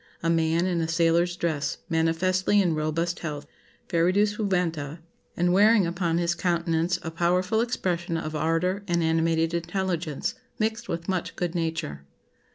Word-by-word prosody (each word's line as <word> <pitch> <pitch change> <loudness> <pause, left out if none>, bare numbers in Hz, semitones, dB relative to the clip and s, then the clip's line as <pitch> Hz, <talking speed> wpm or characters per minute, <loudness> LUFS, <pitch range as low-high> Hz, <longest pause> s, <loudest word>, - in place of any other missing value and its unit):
A 165 - +2
man 165 +1 +2
in 175 -2 0
a 160 - -1
sailor's 170 +1 +2
dress, 160 -5 -1
manifestly 180 +5 +2
in 180 -4 +2
robust 155 +3 -1
health, 150 -3 -5 0.4
fervidus 185 +5 +2
juventa, 170 - -1 0.4
and 175 +1 +2
wearing 210 +1 +5
upon 170 -1 0
his 170 0 +1
countenance 170 -1 0
a 165 - -4
powerful 180 +6 +1
expression 180 -8 -1
of 155 -1 -4
ardour 165 +5 0
and 170 -2 +1
animated 165 0 +1
intelligence, 170 -3 -2 0.2
mixed 225 +2 -2
with 170 0 -3
much 185 -3 -2
good 175 -2 -2
nature. 160 - -3
170 Hz, 145 wpm, -26 LUFS, 165-185 Hz, 0.4 s, wearing